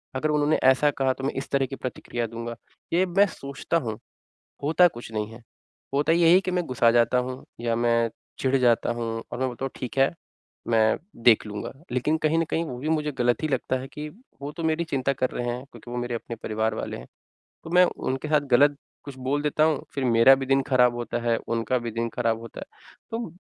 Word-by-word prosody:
अगर 155 +4 0
उन्होंने 150 0 +2
ऐसा 130 +3 +5
कहा 135 -1 +1
तो 135 - -10
मैं 140 - 0
इस 135 - -4
तरह 135 -1 +2
की 135 - -6
प्रतिक्रिया 120 -2 -4
दूँगा। 115 +1 -6 0.4
ये 180 +2 +4
मैं 190 +3 +4
सोचता 140 0 -3
हूँ, 115 -9 -3 0.7
होता 165 +5 +5
कुछ 120 -7 -10
नहीं 105 -1 -2
है। 115 +2 -12 0.5
होता 145 +3 +2
यही 170 0 +5
है 185 - +6
कि 185 - -3
मैं 180 -1 0
गुस्सा 120 -3 +3
जाता 120 +1 +3
हूँ 125 +1 -4 0.2
या 115 -1 0
मैं 115 -1 +2 0.3
चिढ़ 130 0 +2
जाता 120 -3 +3
हूँ 115 -1 -3
और 120 - -4
मैं 130 - +1
बोलता 125 +1 -6
हूँ 135 - -2
ठीक 125 0 -6
है 135 +4 +3 0.5
मैं 110 -1 +3 0.3
देख 115 -2 +6
लूँगा। 105 -1 -5 0.2
लेकिन 130 +5 +1
कहीं 155 +1 +2
न 165 - +2
कहीं 165 - 0
वो 130 -6 -6
भी 145 +5 -4
मुझे 150 -2 0
गलत 120 +2 +2
ही 155 - 0
लगता 130 -2 0
है 130 - -8
कि 150 0 -6 0.3
वो 140 - -4
तो 165 - -4
मेरी 160 +1 +1
चिंता 140 -4 0
कर 130 -1 -1
रहे 120 - -3
हैं 120 +2 -3
क्योंकि 120 0 -12
वो 120 - -4
मेरे 120 0 -3
अपने 115 0 -5
परिवार 110 0 -1
वाले - - -4
हैं। - - -10 0.6
तो 160 - -8
मैं 180 +1 +6
उनके 135 -4 -3
साथ 150 -1 +4
गलत 145 +4 +5 0.3
कुछ 140 -2 -9
बोल 135 +3 -1
देता 150 +1 +2
हूँ 155 -3 +1
फ़िर 135 - -1
मेरा 120 +2 +7
भी 135 0 -4
दिन 135 +1 +3
ख़राब 125 -3 +4
होता 120 0 -3
है 115 -1 +2
उनका 115 +2 0
भी 120 -1 -5
दिन 115 +1 -2
ख़राब 115 -1 0
होता 115 -1 -9
है। - - -8 0.4
तो 225 -7 -4
130 Hz, 230 wpm, -25 LUFS, 120-150 Hz, 0.7 s, मेरा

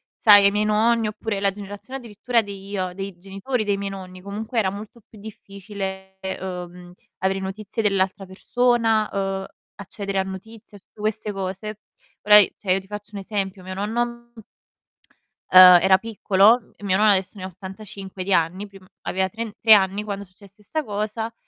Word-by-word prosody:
sai, 205 -2 +7
ai 200 - +6
miei 210 +1 0
nonni 220 +1 +2
oppure 210 -1 -4
la 200 -1 +1
generazione 205 +6 -8
addirittura 235 +1 -1
dei 200 -2 -9
ia 185 -3 -3
dei 195 -1 -7
genitori 195 +6 -3
dei 200 -1 0
miei 200 0 -4
nonni, 185 -1 -9
comunque 215 +4 -3
era 190 -3 +1
molto 210 +4 -9
più 215 - -16
difficile, 195 -2 -8 0.2
uhm, 180 -1 -7 0.3
avere 190 +1 0
notizie 200 +3 -4
dell'altra 195 -1 0
persona, 225 +2 +1
uhm, 195 -1 -2 0.3
accedere 200 0 -4
a - - +1
notizie, 205 +2 -10
tutte 210 - -27
queste 215 0 -2
cose. 195 +2 -5 0.4
Ora 210 0 +8
i 205 - +5
cioè 185 -3 0
io 190 - +1
ti 190 - -21
faccio 210 +1 -8
un 200 - -5
esempio: 195 -2 -4
mio 185 0 -7
nonno 220 +5 -1 0.3
m 225 - -11 1.1
ehm, 185 -1 +10
era 190 0 +6
piccolo, 220 +1 +2
mio 195 -2 0
no 210 - +2
adesso 195 -3 +3
ne 185 - -9
ha - - -3
85 190 0 -9
di 195 0 0
anni, 180 +5 0
prim 195 -1 -16 0.2
aveva 190 0 -1
tren 225 +2 -6
3 220 -1 +7
anni 200 +1 +3
quando 200 -1 -5
successe 200 +3 -20
sta 310 +7 -3
cosa, 215 +1 -4
200 Hz, 175 wpm, -23 LUFS, 190-215 Hz, 1.1 s, ehm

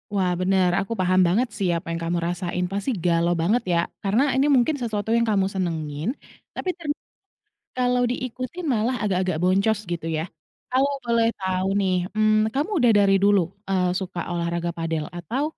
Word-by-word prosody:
Wah, 185 -2 +2
benar, 185 0 +3
aku 200 - -4
paham 185 0 +3
banget 220 +9 +2
sih, 195 -3 0
apa 165 - -5
yang 165 0 -3
kamu 170 +1 0
rasain, 175 0 -2
pasti, 200 +4 -2 0.2
galau 170 0 +3
banget, 220 +8 +2
ya? - - +3 0.3
Karena, 210 +6 +2
ini 270 +2 +3
mungkin 255 +5 +3
sesuatu 215 -2 -2
yang 235 - +3
kamu 195 -3 +2
senengin, 160 -4 -3 0.5
tapi 370 - -3
ternyata 300 -3 -4 0.8
kalau 250 0 +2
diikutin, 255 +7 -4
malah 230 +4 0
agak-agak 185 -5 0
boncos 195 +4 +2
gitu, 165 -1 -4
ya? - - -1 0.5
Kalau 270 +2 +2
boleh 235 -1 +2
tahu 185 0 -1
nih, 190 -1 +1 0.2
mmm, 215 0 +3
kamu 290 - -1
udah 240 - +6
dari 200 -1 +4
dulu, 200 -1 +5 0.3
eee, 185 -2 +2
suka 185 -2 -5
olahraga 170 0 -1
padel, 165 -2 -2
atau, 230 - -2
195 Hz, 170 wpm, -24 LUFS, 175-235 Hz, 0.8 s, udah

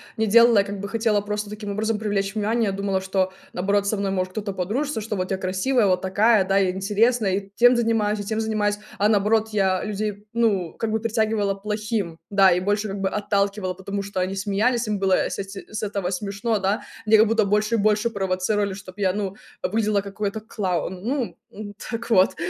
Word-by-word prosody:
не 220 - +1
делала. 230 0 +6
Я - - +4
как 200 0 -6
бы 200 - -4
хотела 220 0 +1
просто 210 0 -4
таким 210 -1 -6
образом 215 +1 -1
привлечь 200 -2 -1
внимание. 220 0 0
Я - - -1
думала, 195 -1 -1
что, 190 0 -1 0.2
наоборот, 200 +2 0
со 215 - 0
мной 195 -1 -1
может 185 -1 -1
кто-то 205 0 -4
подружится, 220 +8 -2
что 210 -1 -4
вот 185 +1 -3
я 190 - +1
красивая, 190 +7 +1
вот 185 -1 +2
такая, 205 +2 +3
да, 195 - +1
я 195 -2 +3
интересная, 205 +2 +1
и 195 0 -4
тем 245 +3 +6
занимаюсь, 220 -3 +1
и - - -4
тем 220 +2 -2
занимаюсь. 210 -2 0 0.2
А 205 +1 +3
наоборот, 215 +1 +2
я 190 -3 +1
людей, 210 -1 -4
ну, 210 -8 +1
как 225 - -2
бы 220 0 0
притягивала 220 -3 0
плохим, 210 -3 -3
да, 195 -2 +5
и 180 - 0
больше 205 +3 0
как 195 0 -5
бы 190 - +1
отталкивала, 200 -2 -1
потому 195 +2 -4
что 200 -1 -3
они 185 +1 -2
смеялись, 215 +5 0
им 210 -1 0
было, 195 -1 +1
э, - - -2
с - - -5
эти 195 0 -7
с 215 - -3
этого 200 -3 -2
смешно, 200 +3 -2
да. 195 +3 0 0.2
Меня 220 0 +6
как 220 +1 +5
будто 225 0 +3
больше 210 +3 +1
и - - +2
больше 215 +2 +2
провоцировали, 195 0 -1
чтобы 190 +1 -10
я, 190 -2 +3
ну, 200 -1 -3 0.3
выглядела 215 0 +1
как 200 0 -9
какой-то 210 +1 -2
клоун, 185 -4 -3
ну, 255 +1 -2
м. 205 -1 -8 0.2
Так 230 0 -4
вот. 190 -4 +4
205 Hz, 215 wpm, -23 LUFS, 195-220 Hz, 0.3 s, делала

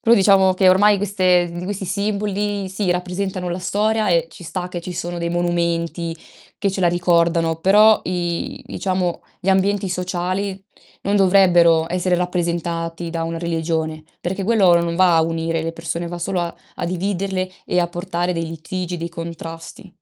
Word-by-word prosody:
Però 235 0 +5
diciamo 190 -2 +5
che 185 0 +4
ormai 205 +2 +5
queste 185 -3 +2
di 175 +1 -6
questi 200 0 -4
simboli 205 0 -1
sì, 190 0 -2
rappresentano 180 +1 -2
la 175 +1 -3
storia 210 +3 0
e 165 -1 +3
ci 175 - -12
sta 180 +3 -4
che 175 -1 -5
ci 180 - -6
sono 175 0 -4
dei 170 0 -2
monumenti 170 -1 -1 0.4
che 200 - 0
ce 190 - -4
la 175 - +5
ricordano 170 -2 +2
però 210 +5 +5
i 175 -1 -3
diciamo 185 -2 -2 0.2
gli 190 - -4
ambienti 195 +1 +2
sociali 185 +2 -2 0.4
non 200 +1 +1
dovrebbero 175 -4 +5
essere 180 0 +1
rappresentati 170 -1 -2
da 165 -1 -2
una 165 0 -3
religione, 160 -2 -2 0.2
perché 190 +3 -3
quello 200 -6 +5
non 170 0 -2
va 180 -3 +5
a 160 - +5
unire 165 0 -1
le 165 - -3
persone 165 +1 -4
va 175 0 -5
solo 180 +1 -1
a 170 0 -3 0.2
a - - -3
dividerle 185 +1 -2
e 180 - +1
a 175 - 0
portare 175 0 -2
dei 165 0 -2
litigi, 175 +2 -5
dei 170 +1 -4
contrasti. 165 +2 -8
180 Hz, 170 wpm, -20 LUFS, 170-190 Hz, 0.4 s, Però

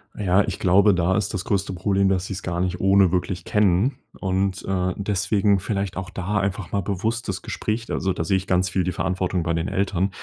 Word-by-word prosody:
Ja, 95 -1 +3
ich - - -4
glaube, 100 +3 +5
da 90 +1 +1
ist 105 - -1
das 95 -2 -2
größte 100 -1 -1
Problem, 95 +1 +1
dass 95 -1 0
sie 100 - -5
es 95 - -6
gar 85 -1 -3
nicht 90 0 -1
ohne 95 -1 +4
wirklich 90 -1 -2
kennen. 105 +5 +2 0.2
Und, 95 +1 -1
äh, 90 -1 0
deswegen 100 0 +1
vielleicht 100 -1 -2
auch 95 0 -5
da 95 +3 -2
einfach 100 -2 -3
mal 100 - 0
bewusst 110 +6 -2
das - - -3
Gespräch 115 +2 -3
da - - -5
also, 95 -1 0
da 80 - -2
sehe 95 +4 +2
ich 95 - -5
ganz 90 0 +2
viel 95 0 0
die 90 - -1
Verantwortung 90 0 -1
bei 85 - 0
den 80 +2 -1
Eltern 95 -1 0
95 Hz, 230 wpm, -23 LUFS, 90-100 Hz, 0.2 s, glaube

